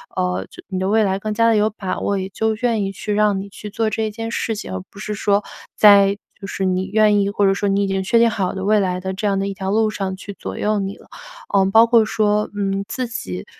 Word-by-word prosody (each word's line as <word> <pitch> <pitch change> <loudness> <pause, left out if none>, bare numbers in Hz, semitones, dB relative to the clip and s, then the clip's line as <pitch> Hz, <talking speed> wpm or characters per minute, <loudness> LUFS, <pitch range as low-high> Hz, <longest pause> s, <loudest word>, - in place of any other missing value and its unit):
呃， 90 +1 -1
就 - - -12
你 190 - -3
的 190 - -1
未 220 +1 +3
来 190 -1 0
更 215 +1 -3
加 230 +1 +3
地 225 - +3
有 210 +1 +3
把 195 -3 -4
握， 200 -1 0
也 190 +1 -4
就 220 +2 -1
愿 225 -2 0
意 195 - -2
去 205 +2 -4
让 210 -1 +2
你 200 - -9
去 210 +1 -9
做 220 +2 -1
这 215 0 -2
件 225 +1 -5
事 225 -1 -2
情， 150 - -7
而 95 - -4
不 200 - -13
是 210 0 -4
说 205 0 +1 0.3
在 200 -1 +6 0.2
就 195 - -8
是 190 - -3
你 185 0 0
愿 210 -2 +4
意， 200 - 0
或 205 -1 +1
者 195 - +4
说 200 +1 -1
你 200 +1 +1
已 - - 0
经 195 0 -1
确 230 +5 +3
定 235 0 +5
好 190 -4 -2
的 190 - -5
未 215 +1 +4
来 180 -2 -1
的 190 +1 -4
这 200 +3 -4
样 195 -1 +1
的 195 - -1
一 200 - -3
条 190 0 -3
路 220 0 +2
上 195 -3 -3
去 200 0 -9
左 - - -6
右 210 0 0
你 195 0 -4
了。 - - -19 0.5
嗯， 195 0 +3
包 225 +2 +6
括 230 -1 +5
说， 210 -1 +1
嗯， 195 -1 -1
自 245 +2 -3
己 90 - -6
200 Hz, 295 characters per minute, -20 LUFS, 195-215 Hz, 0.5 s, 在